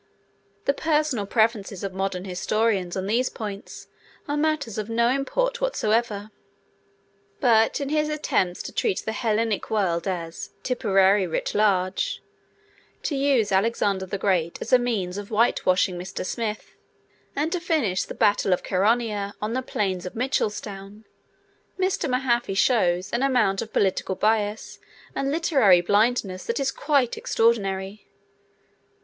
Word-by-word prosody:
The 275 - +3
personal 300 -8 0
preferences 220 -4 0
of 195 -1 -4
modern 190 -1 -3
historians 190 0 0
on 190 - -2
these 235 +5 +1
points 205 -3 -7 0.4
are 290 - -1
matters 295 -8 -1
of 215 +1 -4
no 235 +1 +2
import - - 0
whatsoever. 220 - 0 1.1
But 225 -3 +3
in 280 -1 -3
his 305 0 +1
attempts 190 -12 -1
to - - -6
treat 185 - 0
the 220 - -1
Hellenic 220 -1 -1
world 185 -5 0
as 170 -3 -4
'Tipperary 195 -6 +3
writ 160 - -2
large,' 190 -3 +1 0.8
to 295 - -1
use 270 -7 +2
Alexander 195 -1 +1
the 200 - -3
Great 180 -4 0
as - - -4
a 255 - +8
means 205 -6 -2
of 205 - -7
whitewashing 185 -5 +2
Mr. 185 +1 -5
Smith, 215 0 -4 0.6
and 300 +3 0
to 360 - 0
finish 305 - 0
the - - -8
battle 205 -2 +3
of 180 - -2
Chaeronea 205 0 0
on 215 +2 -3
the 260 - 0
plains 190 -7 -2
of - - -9
Mitchelstown, 210 -4 -3 0.7
Mr. 375 -4 0
Mahaffy 240 -5 0
shows 190 -6 +2
an 235 - 0
amount 245 -8 +2
of 220 - -7
political 190 -1 0
bias 215 +1 0 0.3
and 275 - -1
literary 275 - +4
blindness 205 0 +1
that 235 - -1
is 270 -1 0
quite 280 -5 +1
extraordinary. 200 -3 0
215 Hz, 140 wpm, -24 LUFS, 195-250 Hz, 1.1 s, a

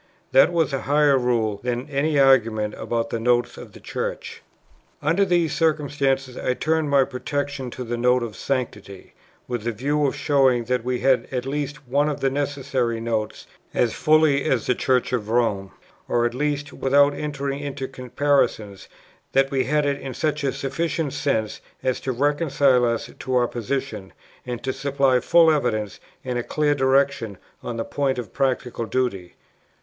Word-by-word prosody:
That 135 +6 +6
was 165 -5 +1
a 135 - -1
higher 145 0 +3
rule 115 -5 0
than 125 +2 -3
any 145 +1 0
argument 115 -6 +3
about 115 -1 -3
the 115 - -2
Notes 120 +1 +1
of - - -11
the - - -12
Church. - - -5 0.6
Under 165 +7 +2
these 175 -4 +1
circumstances 140 -5 0
I 125 - -1
turned 160 0 0
for 140 -2 +4
protection 140 0 -4
to 125 - -6
the 120 0 -3
Note 125 +1 +2
of 115 -2 -6
Sanctity, 105 -8 -4 0.3
with 120 -2 -4
a - - +1
view 145 +6 0
of 135 - -2
showing 135 -4 +2
that 125 0 -1
we 125 0 -2
had 135 -2 +2
at 125 -1 -2
least 145 0 -4
one 145 +4 +2
of 145 - -3
the 135 - +1
necessary 135 -4 -1
Notes, 110 -2 -3 0.3
as 120 -3 +2
fully 155 -3 +3
as 125 -4 +1
the - - +2
Church 130 0 0
of 110 -4 -2
Rome; 110 -5 +1 0.4
or, 120 0 +1
at 120 - -1
least, 145 +2 -2
without 140 +2 +3
entering 140 -1 -3
into 140 -2 -5
comparisons, 130 -6 -1 0.5
that 135 +1 +3
we 130 -2 +1
had 150 +3 +1
it 140 0 -1
in 130 -3 -6
such 150 -1 -1
a 135 - +1
sufficient 140 +2 -2
sense 135 -7 -1 0.2
as 130 -1 0
to 130 - -3
reconcile 140 -1 +2
us 115 -1 -2
to 130 - -2
our 120 -1 +3
position, 115 -4 -4 0.3
and 120 -1 -5
to 130 - -1
supply 135 -2 +1
full 165 +6 +5
evidence, 110 -8 -1 0.3
and 125 -1 -2
a - - -3
clear 150 +2 +1
direction, 135 -6 +1 0.2
on 120 -1 -5
the 115 - -2
point 135 -2 -1
of 120 -4 -6
practical 125 -3 -1
duty. 100 -10 -2
135 Hz, 175 wpm, -23 LUFS, 120-145 Hz, 0.6 s, That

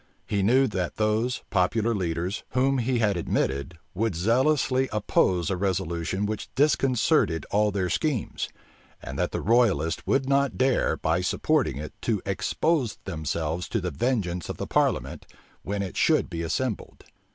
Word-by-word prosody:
He 100 - 0
knew 125 +7 +4
that 95 -6 -2
those, 110 +4 0
popular 110 +4 +2
leaders, 90 -1 -2
whom 135 +1 +2
he 125 +1 0
had 105 -4 +2
admitted, 75 -1 -1 0.2
would 105 0 -1
zealously 130 - +2
oppose 95 -4 +1
a - - +1
resolution 95 0 -1
which 105 0 -4
disconcerted 135 - +2
all 105 +1 +3
their 95 -2 -1
schemes; 140 - -1 0.5
and - - -7
that - - 0
the - - -3
royalists 100 -9 +2
would 135 -1 +2
not 140 0 +2
dare, 130 0 +2
by 80 +3 0
supporting 130 - +1
it, 75 +1 -6
to 110 -4 0
expose 120 - 0
themselves 80 0 -3
to 115 - 0
the 90 -2 -3
vengeance 90 - -1
of - - -4
the - - -3
parliament, - - 0 0.3
when 100 0 -3
it 95 - -6
should - - +2
be 85 -1 -3
assembled. 105 +7 -3
105 Hz, 150 wpm, -26 LUFS, 90-125 Hz, 0.5 s, knew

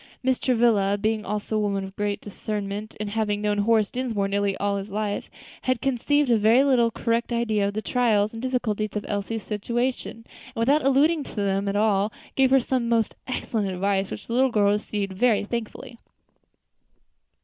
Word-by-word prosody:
Mrs. 260 -1 +1
Travilla, 225 -5 +3
being 215 +1 0
also 210 +2 -3
a - - +2
woman 200 -2 -1
of 190 0 -9
great 205 0 -2
discernment, 205 0 -5
and 210 -1 -4
having 210 -1 0
known 205 0 0
Horace 215 0 +2
Dinsmore 230 -6 -1
nearly 200 0 0
all 200 0 0
his 200 +1 -6
life, 205 0 -3 0.3
had 255 -2 0
conceived 270 +2 +1
a 230 - +4
very 240 +2 +4
correct 235 +1 -1
idea 220 -4 +1
of 200 - -4
the 215 - -2
trials 220 -4 +2
and 225 - -6
difficulties 220 -5 -2
of 210 - -3
Elsie's 205 +1 -3
situation, 235 +2 -3 0.3
and - - -5
without 280 +7 +3
alluding 290 +4 +3
to - - -11
them 200 -1 0
at 200 - -1
all, 205 -1 +2 0.2
gave 265 -1 +4
her 270 +1 +5
some 245 -1 -1
most 230 -2 +1
excellent 220 -5 -2
advice, 195 +1 0
which - - -7
the 230 - -5
little 260 +2 +3
girl 205 -3 +3
received 205 -1 -2
very 225 +2 +2
thankfully. 235 +1 -6
215 Hz, 180 wpm, -25 LUFS, 205-240 Hz, 0.3 s, her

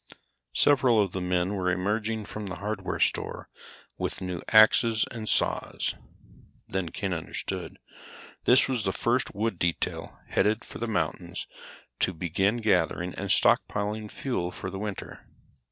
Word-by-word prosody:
Several 130 -5 +5
of 100 -3 +2
the 95 - -3
men 90 +1 0
were 95 -2 0
emerging 105 +4 -1
from 105 0 -6
the 95 - -5
hardware 100 -1 -3
store - - 0 0.5
with - - -3
new 90 -2 -4
axes 110 +1 +6
and 110 -2 -4
saws. - - +1 0.7
Then 95 -3 -2
Ken 95 +3 -3
understood. 80 - -4 0.7
This 130 +2 +6
was 125 -5 -1
the 95 - 0
first 120 +1 0
wood 105 -3 -1
detail 85 -1 -2
headed 105 +2 +1
for - - -9
the 120 - -2
mountains 110 - -2 0.5
to 95 - +2
begin 95 +6 0
gathering 90 -5 +1
and 100 0 -5
stockpiling 105 +3 +2
fuel 110 -10 -2
for 90 +1 -6
the 95 - -5
winter. 105 -2 -6
100 Hz, 140 wpm, -27 LUFS, 90-110 Hz, 0.7 s, axes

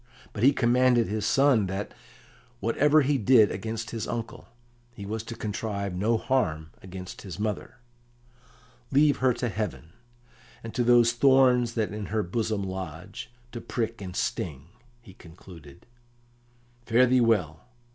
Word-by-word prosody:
But 105 - -6
he 135 +4 +6
commanded 125 -2 +3
his 105 0 -2
son 135 -7 +3
that, 95 +2 -5 0.7
whatever 145 +7 +3
he 140 0 +1
did 110 -2 +5
against 110 +3 -5
his 115 -2 -4
uncle, 115 -1 -6 0.5
he 100 - -8
was 110 +2 -4
to 115 - -7
contrive 105 -2 -4
no 110 +6 +1
harm 80 -12 -1
against 95 0 -9
his 90 -4 -8
mother. 110 +3 -4 1.1
"Leave 145 +1 +4
her 130 0 +2
to 125 - -2
heaven, 105 -7 -5 0.7
and 115 - -7
to 125 - 0
those 120 -1 +5
thorns 125 -2 +3
that 110 -3 -1
in 105 -2 -5
her 110 +3 -1
bosom 110 +2 -2
lodge, 95 -4 -7 0.2
to 120 - -7
prick 115 -2 -4
and 90 -2 -7
sting," 75 -5 -3 0.3
he 95 - -14
concluded. 80 -5 -15 1.0
"Fare 120 +2 +5
thee 125 0 +3
well! 95 -9 +1
110 Hz, 145 wpm, -26 LUFS, 95-120 Hz, 1.1 s, he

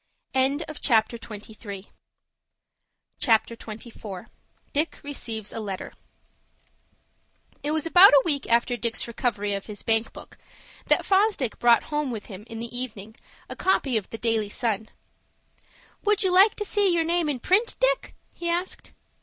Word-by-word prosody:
CHAPTER 265 -4 +1
XXIV. 210 -2 -9 2.9
DICK 305 +3 0
RECEIVES 225 -7 -5
A - - -4
LETTER 200 -3 -6 1.7
It 290 - -2
was 310 0 0
about 355 +4 +8
a 285 -2 +7
week 285 -5 0
after 235 +1 +3
Dick's 235 -1 -1
recovery 220 -4 -1
of 200 -1 -4
his 210 -2 -8
bank 225 0 +1
book, - - -13 0.5
that - - +4
Fosdick 390 - +2
brought 235 -1 +5
home 295 -2 -2
with 225 -4 -5
him 200 0 -10
in 225 - -8
the 235 +1 -6
evening 220 -4 -6 0.3
a - - -7
copy 280 -9 +1
of 215 -3 -1
the 225 - -6
"Daily 225 -2 0
Sun." 220 -1 -2 1.1
"Would 420 0 +2
you 375 - +2
like 390 +3 +6
to 420 - -3
see 405 -2 +2
your 335 -1 +2
name 335 -1 +1
in 275 -4 -2
print, 400 - +2
Dick?" - - +1 0.2
he 340 - -4
asked. 350 +2 -3
250 Hz, 140 wpm, -25 LUFS, 220-340 Hz, 2.9 s, about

